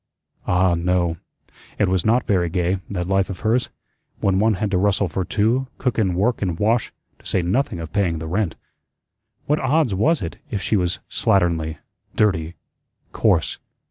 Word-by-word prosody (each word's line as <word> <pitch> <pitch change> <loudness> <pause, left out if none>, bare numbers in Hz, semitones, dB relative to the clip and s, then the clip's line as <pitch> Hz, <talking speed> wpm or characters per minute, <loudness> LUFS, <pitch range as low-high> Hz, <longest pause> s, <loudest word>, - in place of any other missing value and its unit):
Ah, 90 0 +3
no, 85 -1 0 0.6
it 105 - +2
was 95 -1 +1
not 120 +3 +2
very 90 -4 +1
gay, 90 +2 0
that 90 -3 -3
life 95 0 +1
of 95 - -6
hers, 115 +3 +1 0.5
when 95 -1 +2
one 110 0 +3
had 100 +2 -2
to 90 - +2
rustle 100 0 +2
for 90 +3 -2
two, 115 +7 +1
cook 125 -3 -1
and 95 -5 +1
work 110 +6 +1
and 90 -5 -1
wash, 110 +4 +1 0.3
to - - -23
say 95 - +1
nothing 95 +2 0
of 80 -1 -7
paying 95 -6 +1
the 80 - -6
rent. 90 +1 -1 0.9
What 150 +1 +1
odds 135 -3 +2
was 135 - +2
it 85 - -5
if 105 - -2
she 110 - 0
was 90 -3 0
slatternly, 85 -4 +1 0.4
dirty, 85 -6 +1 0.6
coarse? - - +1
95 Hz, 175 wpm, -22 LUFS, 90-110 Hz, 0.9 s, Ah